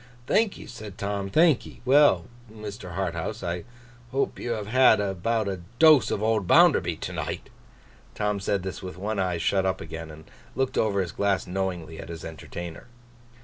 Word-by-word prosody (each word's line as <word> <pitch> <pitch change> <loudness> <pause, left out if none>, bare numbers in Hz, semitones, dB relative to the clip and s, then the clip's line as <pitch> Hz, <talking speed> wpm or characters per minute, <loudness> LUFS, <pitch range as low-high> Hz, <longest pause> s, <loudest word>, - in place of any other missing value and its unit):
'Thank'ee,' 215 - +1
said 110 -5 -9
Tom. 100 -1 -3
'Thank'ee. 160 - +3
Well, 130 - +5 0.3
Mr. 105 -4 -8
Harthouse, 95 +3 -3
I 85 0 -3 0.5
hope 135 +1 -1
you 120 - -2
have 110 -2 -4
had 130 +3 +5
about 105 +3 0
a 95 -3 -3 0.2
dose 155 -7 +7
of 105 - -1
old 110 -4 +1
Bounderby - - +5
to - - -4
night.' - - -5 0.6
Tom 105 -1 0
said 95 -1 -1
this 95 +1 -5
with 90 -2 -7
one 105 +2 -2
eye 90 -2 0
shut 95 +3 +1
up 95 0 0
again, 80 0 -7
and 80 0 -12 0.3
looking 130 +1 +1
over 100 -3 +1
his 90 -3 -3
glass 100 +1 0
knowingly, 90 -4 -3
at - - -8
his 85 -2 -7
entertainer. 85 +2 -8
100 Hz, 170 wpm, -26 LUFS, 90-110 Hz, 0.6 s, dose